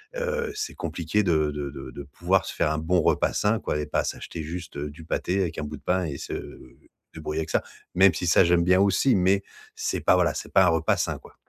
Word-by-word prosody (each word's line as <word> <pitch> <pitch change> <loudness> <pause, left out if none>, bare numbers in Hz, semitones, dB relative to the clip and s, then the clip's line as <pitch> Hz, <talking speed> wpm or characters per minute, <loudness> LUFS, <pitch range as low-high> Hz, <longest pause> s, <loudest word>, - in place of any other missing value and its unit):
Heu, 480 -2 -2
c'est 425 0 -4
compliqué 90 +5 -1
de 80 -5 +2
de 75 -1 -4
de 65 -2 -9
de 70 +3 -8
pouvoir 70 - 0
se - - -5
faire 75 - +1
un 80 - -1
bon 85 +3 +1
repas - - +2
sain, 105 +2 +1
quoi. - - -2
Et 75 - -2
pas 75 - -1
s'acheter 85 - -5
juste 85 0 -7
du 75 +3 -6
pâté 90 +4 -1
avec 85 -3 -2
un 75 - -3
bout 75 +1 -6
de 70 - -21
pain 90 +3 +1
et 70 -4 -4
se - - -6 0.8
débrouiller 80 0 -3
avec 80 - -5
ça. - - +1 0.3
Même 95 0 +6
si, 90 - -3
ça, 85 - +6
j'aime 85 0 +3
bien 90 +1 +4
aussi, 100 +7 +3
mais, 95 +1 +2 0.3
c'est - - -2
pas, - - +4
voilà, 85 -5 +2
c'est - - -7
pas 95 - +6
un - - +5
repas 80 -1 +2
sain, - - -1
quoi. - - -17
85 Hz, 245 wpm, -25 LUFS, 75-95 Hz, 0.8 s, Même